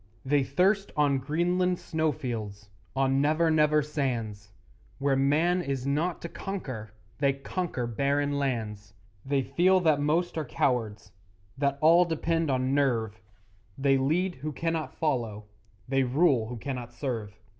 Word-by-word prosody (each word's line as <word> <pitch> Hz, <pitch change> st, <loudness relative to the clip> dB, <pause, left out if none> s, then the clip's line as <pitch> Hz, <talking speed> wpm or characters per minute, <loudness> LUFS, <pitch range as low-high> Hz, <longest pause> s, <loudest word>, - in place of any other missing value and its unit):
They 140 Hz, +1 st, +3 dB
thirst 195 Hz, +9 st, +1 dB
on 140 Hz, -2 st, +3 dB
Greenland 175 Hz, +6 st, 0 dB
snowfields, 115 Hz, -12 st, -3 dB, 0.2 s
On 135 Hz, 0 st, +2 dB
Never 155 Hz, +3 st, +2 dB
Never 150 Hz, -1 st, +3 dB
sands; 115 Hz, -9 st, -3 dB, 0.5 s
Where 140 Hz, 0 st, +1 dB
man 155 Hz, +7 st, +2 dB
is 135 Hz, -5 st, -3 dB
not 155 Hz, +5 st, -1 dB
to -, -, -3 dB
conquer 130 Hz, -, -6 dB, 0.3 s
They 140 Hz, -1 st, +3 dB
conquer 140 Hz, -1 st, -3 dB
barren 140 Hz, +4 st, 0 dB
lands; 105 Hz, -6 st, -3 dB, 0.3 s
They 135 Hz, 0 st, 0 dB
feel 180 Hz, +8 st, +3 dB
that 155 Hz, -4 st, +3 dB
most 165 Hz, +3 st, 0 dB
are 155 Hz, -, -3 dB
cowards, 115 Hz, -5 st, -1 dB, 0.4 s
That 140 Hz, 0 st, 0 dB
all 170 Hz, +3 st, +6 dB
depends 165 Hz, -1 st, -1 dB
on 130 Hz, 0 st, +1 dB
'nerve,' 115 Hz, -7 st, 0 dB, 0.6 s
They 135 Hz, 0 st, +3 dB
lead 175 Hz, +7 st, +1 dB
who 155 Hz, +1 st, -3 dB
cannot 165 Hz, +1 st, -3 dB
follow, 115 Hz, -9 st, -2 dB, 0.4 s
They 135 Hz, +1 st, +2 dB
rule 130 Hz, -3 st, +2 dB
who 120 Hz, +1 st, -6 dB
cannot 125 Hz, -1 st, -5 dB
serve. 115 Hz, -6 st, -5 dB
140 Hz, 135 wpm, -28 LUFS, 125-160 Hz, 0.6 s, all